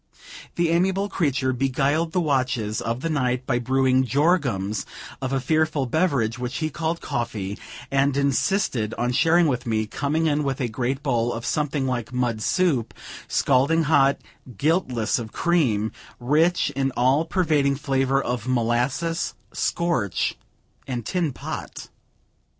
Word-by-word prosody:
The 170 -1 +1
amiable 190 +4 +1
creature 140 -8 0
beguiled 135 +5 0
the 180 - +1
watches 130 -8 0
of 115 +2 -3
the 165 - -2
night 130 -3 0
by 120 -2 +1
brewing 130 +1 +2
jorums 130 - +1 0.4
of 130 0 -2
a 135 - +1
fearful 155 +1 +1
beverage, 130 -6 0
which 125 +1 -3
he 155 -1 -2
called 165 +2 -2
coffee, 110 -5 -3 0.4
and 140 0 +2
insisted 140 - +1
on 120 +1 0
sharing 165 +6 +4
with 125 -5 -1
me; 110 -1 0
coming 145 +8 -1
in 150 -1 +1
with 135 -2 -2
a 125 - 0
great 125 +5 -2
bowl 120 -3 +1
of 115 -1 -5
something 150 -2 -1
like 125 -3 -2
mud 120 -3 -1
soup, 150 -6 +1 0.3
scalding 140 +5 +2
hot, 140 -3 +4 0.4
guiltless 130 - +1
of 110 -2 -7
cream, 125 -12 +1 0.3
rich 155 +6 +2
in 135 -1 0
an 135 - -4
all 130 +5 +3
pervading 155 -5 +1
flavor 135 -1 +1
of 125 -3 -3
molasses, 125 +7 0 0.2
scorch 165 - 0 0.5
and 120 -4 -4
tin 175 -5 0
pot. - - -7
135 Hz, 145 wpm, -24 LUFS, 120-155 Hz, 0.5 s, sharing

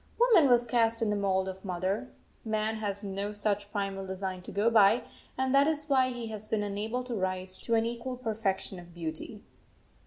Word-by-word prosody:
Woman 445 - +6
was 240 -1 +5
cast 230 -1 +2
in 215 - +1
the - - +1
mould 190 -2 +1
of 190 0 -7
mother. 190 +6 -2 0.3
Man 220 0 -1
has 205 -1 -2
no 200 +1 -3
such 205 -1 -1
primal 195 -2 -2
design 190 -1 -4
to - - -8
go 215 +3 +2
by, 220 +1 +5 0.3
and 260 0 +1
that 280 +1 +5
is 305 -1 -1
why 260 -2 +4
he 240 -2 -5
has 215 -1 -6
been 215 -1 0
unable 215 +5 -2
to 250 -1 -5
rise 185 -2 -1
to 230 - 0
an 225 0 +2
equal 240 +2 -4
perfection 210 -5 -2
of 175 -1 -14
beauty. 170 +6 -4
210 Hz, 195 wpm, -30 LUFS, 195-235 Hz, 0.3 s, Woman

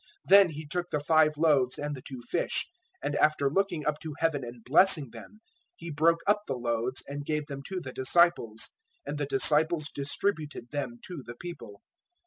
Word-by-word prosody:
Then 195 -2 +7
He 155 0 -8
took 175 +4 -3
the 150 - -1
five 155 0 +3
loaves 140 -5 +2
and 145 0 -4
the 130 - -10
two 130 -2 -9
fish, 170 - -1 0.4
and 145 - -2
after 145 -2 +2
looking 185 -3 -1
up 150 0 -1
to 155 -3 -7
heaven 160 -4 0
and 120 -1 -9
blessing 150 - +5
them, 120 - -13 0.3
He 170 - -8
broke 165 +3 +2
up 205 +1 +3
the 135 - -2
loaves 120 +1 -2
and 145 +1 -5
gave 150 0 -2
them 140 -1 -7
to 190 -1 -4
the 135 -7 -8
disciples, 130 -5 +2 0.3
and 150 - -5
the 145 - -2
disciples 155 +3 +3
distributed 145 -3 -3
them 140 -5 -4
to 180 -6 -7
the 120 - -9
people. 115 -10 -10
150 Hz, 185 wpm, -28 LUFS, 130-165 Hz, 0.4 s, Then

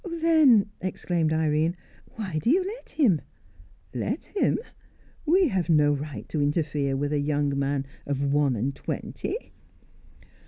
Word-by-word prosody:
"Then," 315 - +4
exclaimed 175 -3 -1
Irene, 160 +1 +1 0.4
"why 190 -8 -3
do 225 - 0
you 365 +6 +3
let 445 +6 -7
him?" 210 - +2 0.7
"Let 220 - -2
him? - - +2 0.7
We 360 +1 +4
have 185 -5 -1
no 150 -2 +4
right 145 +1 -5
to 155 - -1
interfere 145 -2 0
with 145 +2 -1
a 145 - +1
young 145 -1 0
man 140 0 0 0.2
of 140 0 0
one 145 -3 +3
and 125 +6 -1
twenty." 430 - -4
155 Hz, 140 wpm, -26 LUFS, 145-225 Hz, 0.7 s, Then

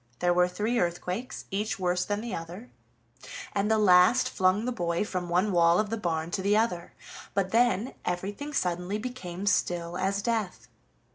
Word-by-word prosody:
There 175 0 +2
were 180 0 +4
three 215 +6 -1
earthquakes, 180 +7 -3
each 210 +3 -2
worse 180 -1 0
than 205 0 -2
the 235 0 -5
other, 175 +8 -7 0.8
and 200 +1 0
the 220 - +3
last 200 +4 +5
flung 190 +4 +2
the 250 - -1
boy 175 -4 -1
from 180 -3 -4
one 180 +4 +2
wall 170 0 +4
of 215 0 -1
the - - +1
barn 170 -5 -2
to 190 - -2
the 205 +2 +3
other, 180 -6 -1 0.4
but 195 -2 0
then 235 0 +2
everything 200 +11 -3
suddenly 180 -4 -1
became 205 -6 -6
still 175 -3 0
as 200 +2 0
death. 205 - -2
190 Hz, 170 wpm, -28 LUFS, 175-215 Hz, 0.8 s, last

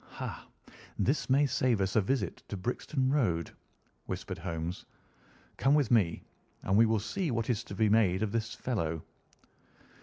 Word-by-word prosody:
"Ha! - - -6 0.5
this 135 +3 0
may 140 +3 +5
save 130 -4 +1
us 95 0 0
a 110 - +5
visit 100 -3 -1
to 100 - -5
Brixton 130 +6 -1
Road," 90 - +1 0.6
whispered - - -5
Holmes. 85 0 -4 0.7
"Come 135 +3 +4
with 145 -6 +2
me, 95 -9 +3 0.4
and 95 - +1
we 115 +2 +6
will 110 -1 +2
see 175 - -2
what 115 -1 0
is 115 0 -1
to 100 - -7
be 110 +2 +3
made 105 -3 +3
of 105 - -1
this 115 0 -2
fellow." 80 -10 -2
110 Hz, 160 wpm, -31 LUFS, 95-130 Hz, 0.7 s, we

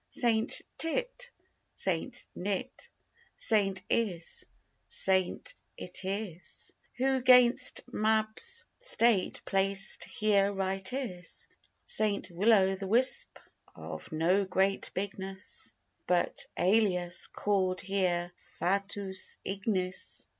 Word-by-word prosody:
Saint 225 -2 +3 0.2
Tit, - - 0 0.5
Saint - - 0
Nit, 205 +7 -4 0.5
Saint 195 -4 +3
Is, 185 -8 -2 0.4
Saint 190 - 0 0.3
Itis, 190 -1 -4 0.2
Who 265 0 +1
'gainst 250 -1 +5
Mab's 220 - 0
state 235 - +2
placed 195 +1 +3
here 200 -2 +1
right 190 -1 -2
is. 205 -10 -5 0.4
Saint 200 -3 0
Will 200 +7 +2
o' 195 -3 +4
th' 195 0 -6
Wisp, 250 +5 +3 0.4
of 80 0 -9
no 170 +5 +2
great 190 +1 0
bigness, 190 - -6 0.3
But, 180 -1 +1
alias, 180 -3 +1
call'd 185 -3 -1
here 180 -2 -1 0.3
FATUUS 195 0 -2
IGNIS. 190 -1 -3
195 Hz, 90 wpm, -30 LUFS, 185-220 Hz, 0.5 s, gainst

